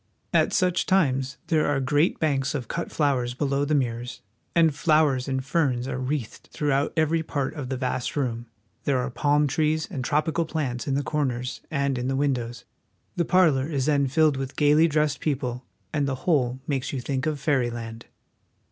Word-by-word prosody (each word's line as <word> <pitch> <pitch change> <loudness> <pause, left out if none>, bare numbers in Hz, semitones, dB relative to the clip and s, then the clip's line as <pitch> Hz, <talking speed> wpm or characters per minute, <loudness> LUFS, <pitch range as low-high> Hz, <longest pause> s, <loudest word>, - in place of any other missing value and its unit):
At - - +3
such 180 -1 +1
times 135 -8 +1
there 160 -3 +2
are 145 -2 +1
great 145 +5 +1
banks 140 -3 0
of 125 -5 -4
cut 170 - -4
flowers 130 -5 0
below 140 0 0
the 150 +1 +1
mirrors, 120 -2 -2 0.3
and 165 -3 +4
flowers 150 -4 +2
and 130 -1 -2
ferns 130 -5 0
are 130 -1 -3
wreathed 130 -2 -4
throughout 145 -1 0
every 160 +1 +2
part 140 -4 -2
of 140 -5 -6
the 130 - -2
vast 125 -1 -2
room. 120 -4 -2 0.4
There 140 -2 +2
are 125 +1 -2
palm 145 +3 +2
trees 155 +2 0
and 130 - -3
tropical 155 +4 +1
plants 140 -6 -3
in 135 - +1
the 140 - 0
corners 125 -5 -2
and 140 -3 0
in 125 - -2
the 135 - 0
windows. 125 -4 -1 0.5
The 170 - +1
parlor 155 -7 +3
is 140 -5 -1
then 140 -2 +2
filled 150 +1 +3
with 135 0 -5
gaily 150 +2 +5
dressed 150 -2 +1
people, 125 -4 -2 0.3
and 145 -2 +1
the 135 - -1
whole 130 -7 +2
makes 135 -3 -2
you 135 - -3
think 130 +3 -2
of 150 -2 -1
fairyland. 120 -6 -2
140 Hz, 185 wpm, -25 LUFS, 130-150 Hz, 0.5 s, gaily